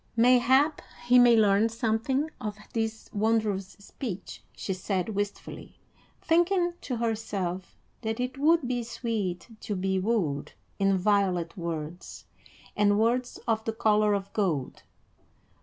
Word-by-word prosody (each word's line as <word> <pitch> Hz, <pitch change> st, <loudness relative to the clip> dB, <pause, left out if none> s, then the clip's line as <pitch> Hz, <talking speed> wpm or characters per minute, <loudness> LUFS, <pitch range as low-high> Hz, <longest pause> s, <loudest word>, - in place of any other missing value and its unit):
"Mayhap 255 Hz, +5 st, +4 dB, 0.2 s
he 245 Hz, +1 st, +6 dB
may 240 Hz, -1 st, +7 dB
learn 210 Hz, +1 st, +4 dB
something 235 Hz, +6 st, -1 dB
of 210 Hz, -1 st, -4 dB, 0.2 s
this 225 Hz, -1 st, -2 dB
wondrous 210 Hz, -3 st, 0 dB
speech," 200 Hz, -1 st, -7 dB
she 195 Hz, -, -3 dB
said 185 Hz, +2 st, -2 dB
wistfully, 205 Hz, -1 st, -5 dB, 0.4 s
thinking 345 Hz, +1 st, +2 dB
to 255 Hz, -, -3 dB
herself 210 Hz, -5 st, -3 dB, 0.2 s
that 225 Hz, 0 st, -3 dB
it 250 Hz, +2 st, -3 dB
would 310 Hz, -2 st, +3 dB
be 245 Hz, -1 st, -1 dB
sweet 220 Hz, -6 st, -3 dB
to 205 Hz, -, -4 dB
be 190 Hz, 0 st, 0 dB
wooed 185 Hz, -9 st, -1 dB, 0.3 s
in 195 Hz, -1 st, +3 dB
violet 185 Hz, -3 st, +1 dB
words 170 Hz, -1 st, -6 dB, 0.5 s
and 205 Hz, -1 st, +3 dB
words 245 Hz, +3 st, 0 dB
of 220 Hz, -1 st, +1 dB
the 225 Hz, -, -1 dB
color 210 Hz, -1 st, +3 dB
of 200 Hz, 0 st, -5 dB
gold. 165 Hz, -11 st, -1 dB
220 Hz, 125 wpm, -28 LUFS, 195-240 Hz, 0.5 s, may